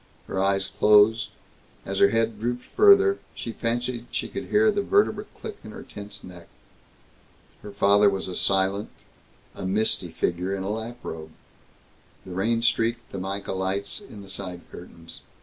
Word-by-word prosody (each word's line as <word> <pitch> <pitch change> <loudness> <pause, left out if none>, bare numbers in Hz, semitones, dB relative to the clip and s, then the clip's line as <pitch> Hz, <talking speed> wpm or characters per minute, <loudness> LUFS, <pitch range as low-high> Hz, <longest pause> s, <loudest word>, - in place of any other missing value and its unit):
Her 95 - -2
eyes 95 0 +1
closed; 105 +1 +5 0.6
as 95 0 -3
her 100 - +6
head 115 0 0
drooped 120 +2 -2
farther, 400 0 +5 0.2
she 115 - -5
fancied 120 +1 -3
she - - -3
could - - -5
hear 215 +1 +4
the 205 -1 0
vertebrae 400 - +2
click 430 -2 -7
in - - -9
her 220 0 -9
tense 100 0 -11
neck. 90 -2 -12 1.1
Her 105 - -9
father 100 +1 +4
was 95 -1 -3 0.2
silent, 95 +1 +1 0.6
a - - -8
misty 95 -2 +1
figure 90 +4 -1
in 95 - -4
a 100 - -2
lap 110 +2 -5
robe. 80 -1 -6 1.0
The 95 - -9
rain 115 +6 0
streaked 115 0 0
the 95 - -5
mica 95 +1 -4
lights 95 - -2
in 105 - -11
the - - -13
side 95 -2 -6
curtains. 85 -2 -11
105 Hz, 160 wpm, -25 LUFS, 95-115 Hz, 1.1 s, her